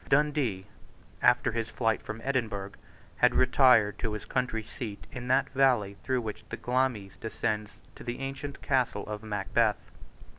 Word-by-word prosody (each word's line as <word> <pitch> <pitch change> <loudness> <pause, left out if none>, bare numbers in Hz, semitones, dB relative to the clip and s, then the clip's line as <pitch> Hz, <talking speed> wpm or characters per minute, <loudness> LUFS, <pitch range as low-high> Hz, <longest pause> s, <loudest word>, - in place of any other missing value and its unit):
Dundee, 135 -9 +2 0.6
after - - +4
his 115 0 -2
flight 115 0 0
from 110 +1 -7
Edinburgh, 110 -7 -1 0.5
had - - +4
retired 125 -5 +5
to 110 - -2
his 105 - -5
country 125 -3 -1
seat 105 -3 -7
in 125 -1 -6
that 135 +1 +3
valley 125 -7 +3
through 130 -2 0
which 110 -1 -6
the - - -4
Glamis 125 -6 -1
descends 110 -1 -2 0.2
to - - -12
the 120 0 -4
ancient 135 +1 -6
castle 115 -5 +1
of 105 -1 -5
Macbeth. 105 +1 0
115 Hz, 150 wpm, -29 LUFS, 105-130 Hz, 0.6 s, retired